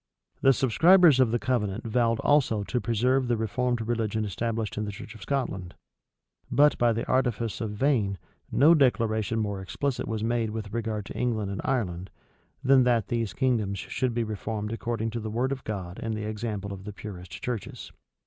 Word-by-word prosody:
The 135 - +6
subscribers 160 - +5
of 130 -3 +5
the 120 - +1
covenant 115 -5 -1
vowed 115 0 +1
also 125 -8 +3
to 125 +4 -2
preserve 125 +3 +1
the 120 -1 +1
reformed 115 +1 -1
religion 110 -2 -1
established 110 +1 -2
in 105 - -2
the 105 - -4
church 100 +1 -9
of 110 - -14
Scotland; 100 -10 -3 0.7
but, 145 +1 +5
by 120 -1 +4
the 115 +1 -2
artifice 120 -4 0
of 110 - -2
Vane, 105 -5 +1 0.3
no 155 +4 +6
declaration 115 -7 +2
more 100 -3 -2
explicit 135 +7 -2
was 110 -1 -2
made 115 -1 0
with 105 -1 -6
regard 110 -3 -2
to - - -8
England 110 -5 -1
and 100 - -4
Ireland, 95 -8 -1 0.5
than 135 0 +6
that 120 -3 +2
these 115 -4 -1
kingdoms 115 -7 +1
should 120 +5 -2
be 120 - +1
reformed 105 0 -4
according 115 -1 -2
to 115 - -3
the 110 -1 -5
word 120 +5 -1
of 135 -1 -4
God 95 -4 -5
and 115 -1 -2
the 105 0 -4
example 105 -2 -4
of 95 0 -9
the 105 - -6
purest 90 -5 -9
churches. 120 -4 -5
115 Hz, 185 wpm, -27 LUFS, 105-125 Hz, 0.7 s, The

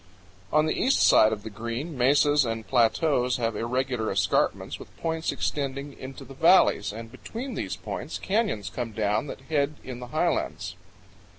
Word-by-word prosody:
69 150 - 0
On 155 - +5
the 155 - -1
east 265 - +3
side 110 - +6
of 105 -2 -4
the 110 - -7
Green, 115 +9 -5
mesas 145 +3 +4
and 115 -2 -3
plateaus 125 +1 +2
have 115 -2 -1
irregular 125 0 -1
escarpments 95 -3 0
with - - -13
points 160 0 -1
extending 140 0 -3
into 130 0 -9
the 135 - -11
valleys, 165 - +4
and 115 +2 -8
between 235 - -7
these - - -3
points - - -5
canyons 200 - -1
come 120 -3 -4
down 105 +4 0
that - - -7
head 145 +1 0
in 125 -2 -7
the 125 - -7
highlands. 95 - -1
130 Hz, 170 wpm, -26 LUFS, 115-150 Hz, -, side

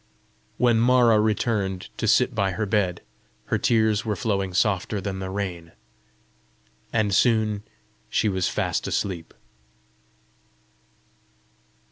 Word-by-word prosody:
When 120 -2 +3
Mara 120 -2 +4
returned 105 -3 -1
to - - -2
sit - - +3
by 95 -1 0
her 105 +5 -2
bed, 95 -4 0 0.4
her - - -1
tears 110 -2 +2
were 110 -3 -2
flowing 100 -4 -1
softer 100 +2 0
than 95 0 -4
the 95 0 -5
rain, 90 -4 -5 1.2
and 105 -3 +1
soon 110 0 +2 0.5
she 110 - +1
was 95 -3 0
fast - - -2
asleep. 90 -5 -3
100 Hz, 110 wpm, -24 LUFS, 95-110 Hz, 1.2 s, Mara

